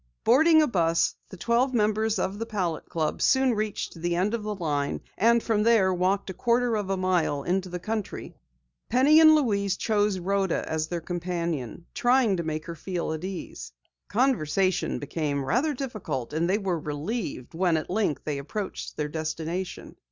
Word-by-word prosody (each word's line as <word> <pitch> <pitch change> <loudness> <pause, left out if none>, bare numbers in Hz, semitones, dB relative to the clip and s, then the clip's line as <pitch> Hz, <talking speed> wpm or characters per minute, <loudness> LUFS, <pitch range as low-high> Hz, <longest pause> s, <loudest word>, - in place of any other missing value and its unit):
Boarding 315 +6 +6
a - - +2
bus, 165 - +1
the 190 - -10
twelve 240 +6 +1
members 215 0 +1
of 200 +2 -2
the 230 - -2
Palette 180 -7 -3
Club 160 -2 -2
soon 265 -2 +4
reached 215 -1 -3
the 175 0 0
end 190 +5 +1
of 235 - -1
the 210 0 -3
line, 145 -6 -2
and 235 +2 +3
from 220 -2 +1
there 210 -4 +4
walked 190 +2 0
a - - -7
quarter 240 +3 +1
of 205 -3 -2
a 195 - 0
mile 175 -6 0
into 185 +1 -1
the 180 - -4
country. 215 +3 -4 0.6
Penny 275 +6 +5
and 315 -1 +8
Louise 200 -9 +1
chose 210 -3 +1
Rhoda 190 0 -1
as 160 0 -1
their 170 0 -3
companion, 170 - -3
trying 245 -6 +3
to 170 - -2
make 155 0 -3
her 170 - -5
feel 170 0 -3
at 160 +1 -6
ease. 185 - -6 0.3
Conversation 195 - +1
became 145 -4 -2
rather 270 - +1
difficult 215 - -4
and 165 +3 0
they 195 - +3
were 190 -5 -1
relieved 150 - -4
when, 170 -1 +2
at 155 - -4
length, 195 -7 0
they 145 -2 -3
approached 190 +8 -5
their 150 - -1
destination. 160 +4 -4
190 Hz, 175 wpm, -26 LUFS, 165-220 Hz, 0.6 s, and